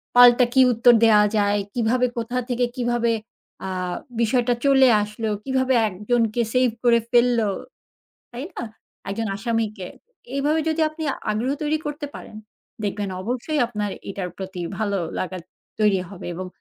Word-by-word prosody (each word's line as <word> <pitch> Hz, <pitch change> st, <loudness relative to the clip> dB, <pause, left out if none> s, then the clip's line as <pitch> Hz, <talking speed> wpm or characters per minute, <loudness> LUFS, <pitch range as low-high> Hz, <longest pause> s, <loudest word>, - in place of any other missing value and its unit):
পাল্টা 245 Hz, 0 st, +8 dB
কি 265 Hz, -, +6 dB
উত্তর 240 Hz, +2 st, +6 dB
দেয়া 215 Hz, -2 st, +6 dB, 0.2 s
যায়? 205 Hz, 0 st, +2 dB
কিভাবে 245 Hz, +1 st, +1 dB
কোথা 235 Hz, +2 st, -2 dB
থেকে 245 Hz, 0 st, +1 dB
কিভাবে 240 Hz, -1 st, +1 dB, 0.6 s
আ -, -, -3 dB, 0.5 s
বিষয়টা 245 Hz, +2 st, +2 dB
চলে 270 Hz, -1 st, +6 dB, 0.2 s
আসলো? 210 Hz, +1 st, -4 dB
কিভাবে 260 Hz, -1 st, +1 dB, 0.2 s
একজনকে 225 Hz, +4 st, 0 dB
সেভ 255 Hz, 0 st, +3 dB
করে 235 Hz, -1 st, +5 dB
ফেলল? 240 Hz, 0 st, +4 dB, 0.9 s
তাই 245 Hz, +3 st, -5 dB
না? -, -, -4 dB, 0.5 s
একজন 220 Hz, +3 st, -2 dB
আসামিকে। 220 Hz, -4 st, -2 dB, 0.5 s
এইভাবে 300 Hz, +3 st, +1 dB
যদি 320 Hz, 0 st, 0 dB
আপনি 310 Hz, +1 st, -9 dB, 0.3 s
আগ্রহ 230 Hz, +6 st, 0 dB
তৈরি 300 Hz, +1 st, 0 dB
করতে 295 Hz, 0 st, -4 dB
পারেন, 215 Hz, -, -10 dB, 0.5 s
দেখবেন 205 Hz, 0 st, -2 dB
অবশ্যই 255 Hz, +7 st, -2 dB
আপনার 210 Hz, -3 st, -3 dB, 0.2 s
এটার 190 Hz, -2 st, -4 dB
প্রতি 190 Hz, -1 st, -6 dB, 0.2 s
ভালো 205 Hz, -2 st, 0 dB, 0.2 s
লাগা 185 Hz, 0 st, -3 dB, 0.4 s
তৈরি 205 Hz, -3 st, +3 dB
হবে। 195 Hz, -, -9 dB
এবং 185 Hz, +2 st, -5 dB
235 Hz, 140 wpm, -23 LUFS, 210-255 Hz, 0.9 s, পাল্টা